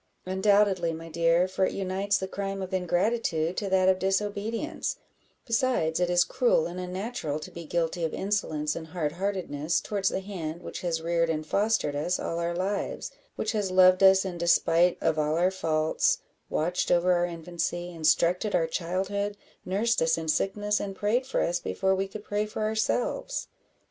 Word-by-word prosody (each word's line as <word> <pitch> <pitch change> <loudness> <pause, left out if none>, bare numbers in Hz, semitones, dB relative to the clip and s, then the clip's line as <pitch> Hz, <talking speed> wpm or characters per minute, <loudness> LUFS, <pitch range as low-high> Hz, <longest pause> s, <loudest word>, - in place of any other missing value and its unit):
"Undoubtedly, 190 -2 +2
my 165 +1 -8
dear, 170 +2 +3
for 190 0 -1
it - - +1
unites 195 +1 0
the 190 - -4
crime 195 0 -4
of 190 0 -7
ingratitude 180 -2 0
to 200 - -2
that 190 0 +3
of 190 0 +4
disobedience; 205 +8 -2 0.5
besides, 230 -9 +1
it 180 -1 +1
is 175 0 +4
cruel - - +2
and 180 - -5
unnatural 185 -3 -3
to - - -9
be 170 -1 -8
guilty 170 +1 -1
of 160 - 0
insolence 155 -7 -1
and 160 -1 -6
hard 155 -3 -2
heartedness 170 -4 -1
towards 200 -2 -1
the - - -2
hand 175 -4 -6
which - - -6
has 165 -2 -2
reared 170 0 +1
and 155 -1 -2
fostered 205 -5 +1
us 175 +5 -1
all 165 - -3
our 170 0 -1
lives 195 +3 -2 0.2
which - - -1
has 210 -4 -1
loved 185 0 +6
us 190 0 +6
in 180 -2 -5
despite 170 0 +3
of 160 -1 +1
our 160 +5 +2
faults 160 -4 +1 0.3
watched 175 +4 0
over 175 +1 +4
our 175 0 +2
infancy 175 +1 -4
instructed 170 +4 +2
our 170 -2 +3
childhood 195 +5 -2 0.3
nursed 220 +6 +1
us 160 0 +3
in 160 -1 -4
sickness, 205 +5 0
and 195 -1 -4
prayed 230 +7 0
for 265 - 0
us 175 +1 0
before 190 +2 0
we 190 0 -1
could 205 +2 -9
pray 210 0 -1
for 215 0 -4
ourselves." 220 - -1
185 Hz, 175 wpm, -27 LUFS, 170-200 Hz, 0.5 s, loved